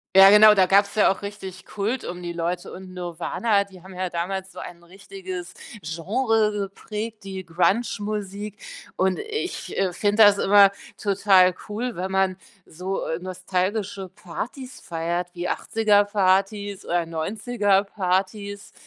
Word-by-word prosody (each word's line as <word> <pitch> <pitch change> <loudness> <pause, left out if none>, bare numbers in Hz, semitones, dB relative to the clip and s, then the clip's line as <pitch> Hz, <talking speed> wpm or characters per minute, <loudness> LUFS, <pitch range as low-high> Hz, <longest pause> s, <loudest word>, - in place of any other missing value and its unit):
Ja 195 +1 +10
genau, 210 0 +8
da 190 -2 +5
gab's 200 +2 +3
ja 210 - +5
auch 190 - -5
richtig 195 -2 -8
Kult 215 +5 -2
um 175 0 -6
die 175 - -4
Leute 170 +1 -3
und 185 0 -10
Nirvana, 180 +4 0
die 190 -3 -16
haben 190 0 -12
ja 185 0 -3
damals 190 +3 -4
so - - -18
ein 170 -1 -9
richtiges 185 0 -8 0.3
Genre 215 +7 0
geprägt, 210 +2 -5
die 190 -2 -7
Grunge-Musik, 205 +3 -1 0.4
und 190 0 +1
ich, 435 -4 -5
äh, 190 -2 +1
finde 205 +3 +3
das 205 -1 +6
immer 200 0 +6 0.3
total 195 -2 +4 0.2
cool, 230 +3 -3
wenn 185 +2 -3
man 190 -1 +1 0.3
so 185 +4 -4 0.2
nostalgische 185 +2 -3
Partys 250 +10 -8
feiert 170 0 -3
wie 175 +1 -3
80er 210 -2 +2
Partys 200 0 0
oder 175 -1 0
90er 200 +5 0
Partys. 200 +1 -2
195 Hz, 140 wpm, -24 LUFS, 180-205 Hz, 0.4 s, Ja